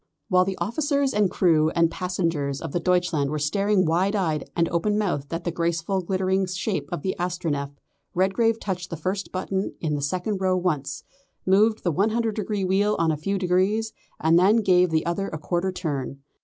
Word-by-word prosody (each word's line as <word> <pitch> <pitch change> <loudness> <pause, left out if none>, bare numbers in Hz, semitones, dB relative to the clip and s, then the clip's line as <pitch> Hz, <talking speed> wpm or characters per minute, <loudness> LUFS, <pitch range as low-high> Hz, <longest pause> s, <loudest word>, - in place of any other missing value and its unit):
While 185 -2 +4
the 195 0 -3
officers 280 +3 0
and 210 -2 +3
crew 160 -5 +3
and 165 -1 +3
passengers 165 -7 -2
of 165 - -6
the 175 - 0
Deutschland 175 -5 +1
were 155 - -2
staring 195 +6 +1
wide 180 +6 +1
eyed 160 -6 -1
and 170 -1 +2
open 205 +5 0
mouthed 145 -10 -1
at 165 +1 -3
the 175 - -1
graceful 170 +3 -1
glittering 190 +1 0
shape 185 -4 -3
of - - -4
the 190 - -1
Astronef, 170 -6 -2 0.5
Redgrave 205 +5 +2
touched 180 -2 -4
the 165 - -5
first 190 +5 -3
button 190 +1 -2
in 155 -2 -1
the 145 - -1
second 185 +7 -2
row 185 -1 +2
once, 155 -7 -2 0.4
moved 210 +4 +3
the 175 - +1
100 220 +6 +1
degree 205 -2 -2
wheel 200 +3 +2
on 165 -1 +2
a - - 0
few 195 +7 -2
degrees, 195 +5 +1 0.3
and 165 +2 +4
then 210 +5 +4
gave 180 -2 +4
the 160 -1 0
other 175 +4 -1
a 155 - -5
quarter 175 +5 -1
turn. 140 -6 -4
180 Hz, 190 wpm, -24 LUFS, 165-195 Hz, 0.5 s, While